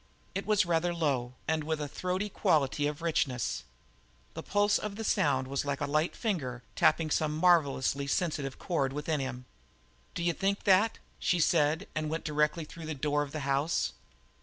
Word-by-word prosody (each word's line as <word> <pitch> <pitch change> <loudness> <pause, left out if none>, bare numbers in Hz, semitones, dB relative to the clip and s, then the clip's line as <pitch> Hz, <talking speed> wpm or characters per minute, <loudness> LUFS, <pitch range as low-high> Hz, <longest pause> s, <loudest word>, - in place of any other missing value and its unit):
It 195 +2 -4
was 210 -2 +4
rather 170 +1 +1
low, 130 -7 -1
and 160 0 +1
with 160 0 -2
a 150 - -3
throaty 185 +6 -2
quality 145 -6 +1
of 150 +2 -5
richness. 140 -7 0 0.7
The - - -5
pulse 205 0 +2
of 210 -1 -5
the 225 - -5
sound 135 -9 +2
was 135 +1 -1
like 140 -1 -2
a 145 - 0
light 155 +4 0
finger 130 - -2
tapping 160 -2 +3
some 155 0 +1
marvellously 140 -5 +3
sensitive 145 -4 -1
chord 140 -7 -1
within 150 +1 -1
him. 125 -2 -4 0.7
"D'you 170 0 +1
think 200 +3 -1
that?" 205 +3 +4 0.2
she 175 - +1
said, 160 +3 +2
and 155 0 -2
went 160 +1 -3
directly 150 +1 +1
through 160 +1 -9
the 155 - -3
door 145 +1 0
of 145 -1 -4
the 155 - -4
house. 140 +3 0
155 Hz, 175 wpm, -30 LUFS, 140-175 Hz, 0.7 s, was